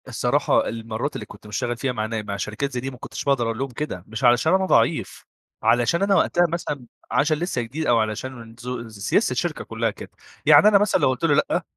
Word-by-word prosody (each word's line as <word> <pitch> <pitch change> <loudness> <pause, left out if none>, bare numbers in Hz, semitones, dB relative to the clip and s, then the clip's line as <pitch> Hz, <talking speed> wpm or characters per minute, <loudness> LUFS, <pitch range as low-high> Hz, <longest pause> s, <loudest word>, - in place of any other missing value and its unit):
الصراحة - - +1
المرات 115 +5 -4
اللي 105 - -5
كنت 105 +1 -14
مشتغل 120 +3 -2
فيها 130 +3 -1
مع 110 -3 -2
نا 110 0 -3
مع 100 -1 -5
شركات 105 +8 -3
زي 125 - -3
دي، 135 +2 -4
ما 125 - -11
كنتش - - -7
باقدر 135 -4 +2
أقول 115 0 -2
لهم 135 -1 -3
كده، 120 -9 -5
مش 115 +4 -6
علشان 120 +7 +4
أنا 190 0 +3
ضعيف، - - +1 0.4
علشان 120 - +3
أنا 200 0 +3
وقتها 175 -1 +3
مثلًا 150 -6 -4 0.3
عشان 150 +4 +2
لسه 170 -6 -2
جديد، 140 +8 -4
أو 120 -1 +4
علشان 115 +1 -4 0.3
ز 110 - -12
سياسة 100 - +1
الشركة - - -2
كلها - - -2
كده، - - -11 0.3
يعني - - +7
أنا 210 -1 +7
مثلًا 205 -3 +2
لو 135 - +4
قلت 130 +2 -3
له 165 -3 +4
لأ، 150 - +1
125 Hz, 220 wpm, -23 LUFS, 115-150 Hz, 0.4 s, يعني